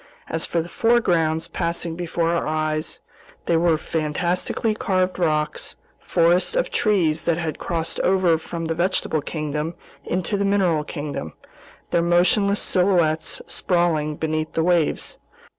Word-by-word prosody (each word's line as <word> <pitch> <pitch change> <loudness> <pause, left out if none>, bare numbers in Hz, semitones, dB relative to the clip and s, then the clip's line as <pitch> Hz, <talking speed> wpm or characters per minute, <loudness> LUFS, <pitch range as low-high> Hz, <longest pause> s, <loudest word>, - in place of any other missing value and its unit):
As 160 - -2
for 170 -1 0
the - - -9
foregrounds 170 -7 +2
passing 170 0 -3
before 170 -1 -1
our 170 - 0
eyes, 155 0 -1 0.5
they 170 - +2
were 165 -1 +3
fantastically 170 +8 -1
carved 185 -3 0
rocks, 155 -3 -1 0.2
forests 175 - +2
of - - 0
trees 170 -8 +1
that 170 -1 +2
had 165 -3 -3
crossed 165 -1 -2
over 180 -3 +3
from 165 +1 -5
the 165 - -1
vegetable 170 -2 0
kingdom 150 +2 -3 0.3
into 185 +5 -1
the 200 - 0
mineral 190 -6 +2
kingdom, 145 - -5 0.6
their 170 - +3
motionless 180 +4 +3
silhouettes 175 -4 +1
sprawling 165 -4 0
beneath 155 0 -2
the 160 - +1
waves. 175 -2 0
170 Hz, 135 wpm, -22 LUFS, 155-180 Hz, 0.6 s, were